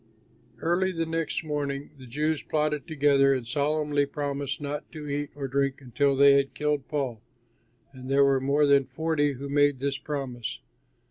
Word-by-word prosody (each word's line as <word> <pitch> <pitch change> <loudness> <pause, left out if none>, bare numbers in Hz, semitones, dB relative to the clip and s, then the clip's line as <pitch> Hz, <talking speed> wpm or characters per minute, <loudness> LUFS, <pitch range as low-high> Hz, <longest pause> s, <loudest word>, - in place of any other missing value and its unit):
Early 180 +3 +2
the 165 -2 -2
next 165 0 -2
morning 145 -2 -3
the 130 - -11
Jews 150 +5 -1
plotted 150 -2 -1
together 140 -2 +3
and 125 -2 -4
solemnly 145 +2 0
promised 140 -1 -3
not 145 0 -5
to 150 -2 -7
eat 145 0 -2
or 140 -2 -4
drink 140 +1 0
until 140 +2 +1
they 140 +1 +7
had 140 0 -1
killed 150 -2 -1
Paul, 130 -7 -3 0.7
and 130 0 -9
there 140 +1 +5
were 135 -1 +3
more 140 +2 +3
than 140 -1 +4
forty 145 +2 0
who 135 +2 -7
made 145 0 +3
this 140 +1 -2
promise. 130 - -4
140 Hz, 165 wpm, -27 LUFS, 135-150 Hz, 0.7 s, they